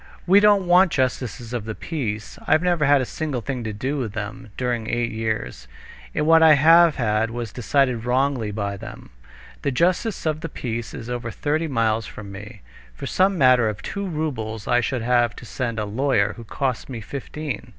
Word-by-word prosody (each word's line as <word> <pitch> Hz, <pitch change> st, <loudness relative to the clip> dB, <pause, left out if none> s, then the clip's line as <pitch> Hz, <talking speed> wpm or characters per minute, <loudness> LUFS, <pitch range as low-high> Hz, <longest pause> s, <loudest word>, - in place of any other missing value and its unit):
"We 190 Hz, +3 st, +6 dB
don't 205 Hz, -2 st, +4 dB
want 180 Hz, 0 st, +5 dB
justices 125 Hz, -3 st, -2 dB
of 120 Hz, -4 st, -3 dB
the 110 Hz, -1 st, -5 dB
peace. 110 Hz, -10 st, -4 dB
I've 155 Hz, +3 st, +3 dB
never 175 Hz, -4 st, +2 dB
had 140 Hz, -1 st, +5 dB
a -, -, -1 dB
single 140 Hz, -2 st, -3 dB
thing 125 Hz, -1 st, -4 dB
to 110 Hz, -, -2 dB
do 130 Hz, +7 st, -3 dB
with 115 Hz, -6 st, -3 dB
them 110 Hz, +3 st, -6 dB
during 120 Hz, -3 st, -2 dB
eight 120 Hz, -1 st, -1 dB
years. 110 Hz, -, -3 dB, 0.5 s
And -, -, +1 dB
what 165 Hz, +1 st, +6 dB
I 160 Hz, -1 st, +8 dB
have 165 Hz, +2 st, +6 dB
had 110 Hz, -2 st, 0 dB
was 115 Hz, -2 st, -5 dB
decided 125 Hz, -1 st, +1 dB
wrongly 125 Hz, -2 st, 0 dB
by 100 Hz, -1 st, -3 dB
them. -, -, -10 dB, 0.5 s
The -, -, 0 dB
justice 180 Hz, -, 0 dB
of 155 Hz, -1 st, -1 dB
the 165 Hz, -, -5 dB
peace 115 Hz, -4 st, -5 dB
is 115 Hz, -, -8 dB
over 120 Hz, -1 st, -4 dB
thirty 155 Hz, +7 st, -1 dB
miles 115 Hz, -5 st, 0 dB
from 100 Hz, -2 st, -9 dB
me. 105 Hz, +3 st, -10 dB, 0.3 s
For -, -, -7 dB
some 190 Hz, +1 st, +2 dB
matter 130 Hz, -5 st, +5 dB
of 105 Hz, -, -7 dB
two 200 Hz, -1 st, -4 dB
roubles 125 Hz, -, -4 dB
I 120 Hz, 0 st, +3 dB
should 125 Hz, -1 st, -2 dB
have 120 Hz, -1 st, +2 dB
to -, -, -11 dB
send 120 Hz, -1 st, -3 dB
a 105 Hz, -, -1 dB
lawyer, 105 Hz, -1 st, +1 dB
who 115 Hz, -, -10 dB
costs 130 Hz, +2 st, -3 dB
me 125 Hz, -3 st, -5 dB
fifteen." 140 Hz, +2 st, -6 dB
125 Hz, 195 wpm, -23 LUFS, 110-150 Hz, 0.5 s, I